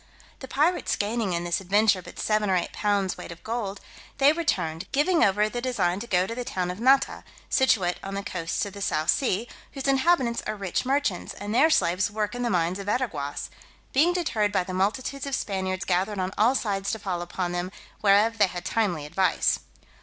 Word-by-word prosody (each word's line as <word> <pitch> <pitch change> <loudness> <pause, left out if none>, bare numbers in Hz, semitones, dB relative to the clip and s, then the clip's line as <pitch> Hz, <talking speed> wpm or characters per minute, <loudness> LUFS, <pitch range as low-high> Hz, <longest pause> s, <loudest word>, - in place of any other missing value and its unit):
The 265 - -8
pirates 310 +7 +1
gaining 210 -2 -1
in 170 0 -1
this 175 +1 -1
adventure 200 +1 +3
but - - -12
seven 215 -1 +1
or 190 - +3
eight 175 - -1
pounds 200 -3 0
weight - - -8
of 170 - -11
gold, 220 -4 -3 0.4
they 280 +2 +5
returned, 175 - -1
giving 320 +5 +3
over 210 +2 +3
the 240 +3 -4
design 195 -8 0
to 235 - -7
go 180 -2 +2
to 230 - -5
the 245 +1 -4
town 180 -6 -2
of 180 - -8
Nata, 265 +3 +3 0.3
situate 200 -10 +2
on 195 0 -6
the 200 - -3
coasts 180 -4 -2
of 200 - -8
the 200 - -8
South 155 -5 +1
Sea, 240 -5 0 0.3
whose 275 -1 -4
inhabitants 270 -3 +2
are 215 - -2
rich 200 +4 -2
merchants, 270 -9 -1
and 205 +1 -5
their 295 +7 +5
slaves 185 - +2
work 210 +1 -2
in 245 - -4
the 240 - 0
mines 180 0 0
of 200 - -7
Veraguas; 185 - -2 0.4
being 310 +6 +4
deterred 245 - 0
by 195 - +1
the 185 - -6
multitudes 255 +9 -1
of 275 - -1
Spaniards 190 -3 -2
gathered 190 +3 0
on 185 +1 -2
all 230 +5 +3
sides 200 -5 -1
to - - -2
fall 185 -4 -3
upon 175 +1 -3
them, 175 +1 -3 0.3
whereof 215 +2 +4
they 205 - +6
had 175 -1 -7
timely 180 -10 0
advice. 185 +4 +1
205 Hz, 205 wpm, -26 LUFS, 185-245 Hz, 0.4 s, they